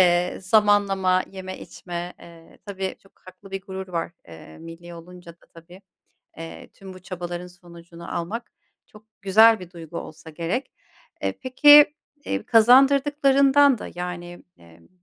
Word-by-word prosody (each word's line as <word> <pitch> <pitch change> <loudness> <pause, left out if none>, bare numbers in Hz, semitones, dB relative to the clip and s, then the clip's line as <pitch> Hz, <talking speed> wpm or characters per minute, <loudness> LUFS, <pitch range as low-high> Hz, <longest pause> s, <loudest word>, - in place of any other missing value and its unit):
eee, 175 0 +2
zamanlama 195 -2 +2
yeme 185 -1 -8
içme, 175 0 -8
eee, 165 -1 -17
tabii 190 -1 -5
çok 195 - -24
haklı 185 +1 -15
bir 195 0 -5
gurur 190 -1 -8
var, 170 -1 -4 0.2
eee, 80 -1 -14
millî 165 +1 -11
olunca 175 0 -13
da, 170 - -28
tabii, 175 +3 -15 0.6
eee, 165 0 -10
tüm 190 -1 -12
bu - - -12
çabaların 175 -1 -7
sonucunu 170 -1 -11
almak 220 +8 -6 0.4
çok 210 0 -18 0.2
güzel 220 +3 +5
bir 180 -1 -11
duygu 170 -2 -9
olsa 160 +1 -11
gerek. 170 - -4 0.5
Eee, - - -1
peki, 290 +3 +6 0.3
eee, - - -3
kazandırdıklarından 275 +2 +4
da - - -8
yani, 175 0 -7
emm 85 0 -20
185 Hz, 140 wpm, -23 LUFS, 170-210 Hz, 0.6 s, peki